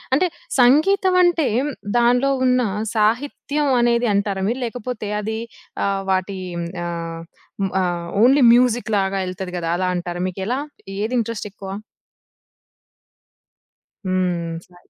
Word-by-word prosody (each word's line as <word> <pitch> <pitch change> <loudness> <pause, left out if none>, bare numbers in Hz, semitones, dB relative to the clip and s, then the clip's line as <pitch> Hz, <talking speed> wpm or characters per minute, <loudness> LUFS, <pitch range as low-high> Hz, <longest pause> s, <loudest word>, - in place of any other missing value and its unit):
అంటే, 360 +5 +2 0.3
సంగీతం 365 +9 +4
అంటే, 340 -5 +3 0.5
దానిలో 245 +3 +3
ఉన్న 250 0 +3 0.3
సాహిత్యం 275 +6 0
అనేది 235 0 +2
అంటారా 200 -1 0
మీరు? 245 - -2
లేకపోతే, 235 -2 -5
అది 220 +1 -3 0.5
ఆహ్, 195 -1 0
వాటి 190 +1 -1 0.2
హ్మ్. 170 0 -3 0.2
ఆహ్, 165 -1 -5 0.4
హ్మ్. 195 - 0
ఆహ్, 175 -1 -2
ఓన్లీ 265 +2 +6
మ్యూజిక్ 245 -2 +2
లాగా 195 0 0
ఎళ్తది 185 0 -6
కదా! 165 -1 -3
అలా 185 0 0
అంటారా? 175 0 -4
మీకెలా 195 +8 -3 0.4
ఏది 220 +4 -2
ఇంట్రెస్ట్ 225 -2 -3
ఎక్కువ? 195 -2 -9 2.4
హ్మ్. 180 -3 -1
సా 180 - -22
215 Hz, 120 wpm, -21 LUFS, 185-250 Hz, 2.4 s, ఓన్లీ